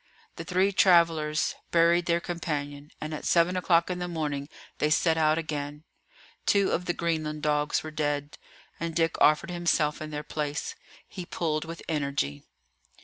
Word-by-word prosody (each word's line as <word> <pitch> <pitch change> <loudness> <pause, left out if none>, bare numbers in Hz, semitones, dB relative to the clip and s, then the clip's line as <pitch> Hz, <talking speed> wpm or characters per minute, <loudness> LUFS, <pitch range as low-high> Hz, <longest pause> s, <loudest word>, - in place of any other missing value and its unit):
The - - -5
three 190 +2 +2
travellers 165 -5 +3 0.2
buried 170 +1 +3
their 170 0 +3
companion, 150 -4 -4
and 155 0 -5
at 155 - -5
seven 170 +1 +3
o'clock 175 -1 +2
in 180 - -3
the 180 - -3
morning 150 -4 -3 0.3
they 150 - +2
set 160 +2 +3
out 155 -1 +3
again. 150 -2 -4 0.6
Two 200 -1 +3
of 180 - -1
the 175 - 0
Greenland 155 -3 -2
dogs 150 0 +1
were 155 - -6
dead, 145 -1 -2 0.4
and 165 0 -3
Dick 165 -1 +1
offered 155 +5 +4
himself 170 -4 +1
in 155 - -5
their 150 0 -5
place. 150 -1 -3 0.3
He 185 - -7
pulled 160 -2 -2
with 165 0 -8
energy. 140 - -1
155 Hz, 160 wpm, -27 LUFS, 150-170 Hz, 0.6 s, offered